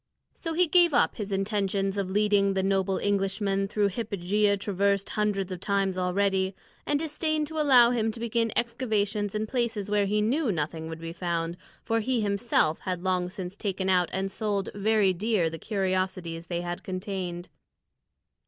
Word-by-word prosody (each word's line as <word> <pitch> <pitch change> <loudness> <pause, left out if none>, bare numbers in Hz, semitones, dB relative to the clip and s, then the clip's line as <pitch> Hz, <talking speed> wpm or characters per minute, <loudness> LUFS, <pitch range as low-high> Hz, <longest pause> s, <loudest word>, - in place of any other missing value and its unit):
So 330 -2 -5
he 360 +2 +5
gave 345 -2 +4
up - - +3
his 205 -3 -4
intention 195 0 0
of 190 -2 -2
leading 200 -1 +2
the 190 - +1
noble 195 0 +1
Englishman 195 0 0
through 205 0 +1
hypogea 200 -1 0
traversed 200 0 0
hundreds 200 -3 -1
of 185 - -4
times 195 -1 0
already, 190 +1 +1 0.3
and 295 - +2
disdained 310 0 -1
to 320 -1 -4
allow 250 -5 +6
him 225 -2 +1
to 230 - -7
begin 230 -1 0
excavations 215 -4 -1
in 215 +1 0
places 225 -4 -2
where 205 -1 +2
he 210 +2 +1
knew 245 +4 +1
nothing 160 -1 -3
would 160 0 -7
be 165 0 -6
found; 170 -1 -2 0.3
for 225 0 +1
he 245 +2 0
himself 200 -6 +1
had 180 -2 -4
long 180 -1 0
since 185 0 -6
taken 190 -2 -2
out 180 -2 +3
and 195 0 -2
sold 200 -1 -2
very 205 -1 +2
dear 190 -3 0
the 165 - -7
curiosities 185 -4 -2
they 175 -1 -2
had 175 0 -4
contained. 185 -2 -4
200 Hz, 170 wpm, -27 LUFS, 185-220 Hz, 0.3 s, allow